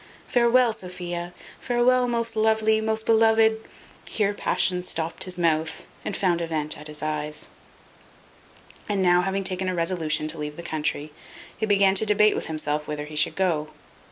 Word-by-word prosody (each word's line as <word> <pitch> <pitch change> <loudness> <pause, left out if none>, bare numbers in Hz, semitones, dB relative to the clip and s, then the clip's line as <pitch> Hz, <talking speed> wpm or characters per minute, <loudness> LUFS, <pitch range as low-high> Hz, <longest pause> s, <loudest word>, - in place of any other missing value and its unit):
Farewel, 240 -1 +4
Sophia; 175 -3 -5 0.3
farewel, 250 +1 +2
most 230 -1 -1
lovely, 220 0 +2
most 220 0 -1
beloved 225 0 +4 0.2
" - - -20
Here 205 -2 +2
passion 180 -2 -1
stopped 165 -2 -2
his 180 -1 -3
mouth, 160 -2 0 0.2
and - - -3
found 175 -3 +1
a 165 - -2
vent 155 -2 -2
at 150 - -9
his 150 0 -4
eyes. 150 0 -3 1.4
And 200 -2 +1
now 175 0 +4
having 195 +2 -1
taken 185 0 0
a 185 - -2
resolution 165 -3 -1
to 160 - -3
leave 150 0 -5
the 170 - -7
country, 150 -2 -3 0.4
he 220 - -2
began 200 -2 +4
to 195 - +3
debate 210 +1 +4
with - - -3
himself 150 -1 -2
whither 150 -1 -4
he 150 +1 -10
should 150 - +1
go. 170 -5 0
180 Hz, 170 wpm, -25 LUFS, 155-220 Hz, 1.4 s, Farewel